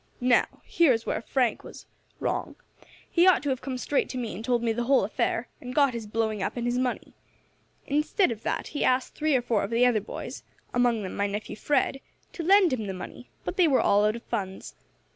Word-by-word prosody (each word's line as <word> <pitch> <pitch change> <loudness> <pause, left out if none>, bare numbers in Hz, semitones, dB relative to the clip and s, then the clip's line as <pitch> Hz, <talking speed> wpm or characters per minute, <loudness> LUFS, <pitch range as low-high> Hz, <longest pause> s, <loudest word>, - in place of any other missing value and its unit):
Now, 250 0 +2
here 335 -5 +4
is 225 -1 -3
where - - -2
Frank 245 -1 0
was - - -11 0.3
wrong. - - -2 0.5
He 345 +1 +3
ought 370 - +5
to 290 - -1
have 260 -1 -1
come 260 -1 -4
straight 280 +3 0
to 255 - -5
me 235 -3 -3
and 210 - -7
told 240 -1 +1
me 230 - +2
the 240 +1 -2
whole 270 +1 +4
affair, - - -1
and 250 0 -7
got 280 -3 +4
his 230 -2 -5
blowing 220 -1 -1
up 190 - -3
and 240 - -2
his 240 +1 0
money. 255 -1 -2 0.7
Instead 300 - +1
of 220 -2 -6
that, - - -3
he 290 - -2
asked 255 0 +1
three 310 -2 +1
or 245 - +1
four 225 -4 +1
of 200 - -3
the 235 +2 +3
other 235 -4 +3
boys 210 - -7 0.3
among 240 -3 +2
them 185 - -5
my 200 0 0
nephew 205 +1 -5
Fred 270 +3 0 0.3
to - - -5
lend 375 -1 +5
him 220 -5 -2
the 190 - -4
money, 185 - -9 0.2
but - - -4
they 360 -3 +5
were 270 -4 +3
all 205 +1 +3
out 210 +1 +2
of 235 - -8
funds. 195 -5 -5
245 Hz, 230 wpm, -27 LUFS, 220-275 Hz, 0.7 s, ought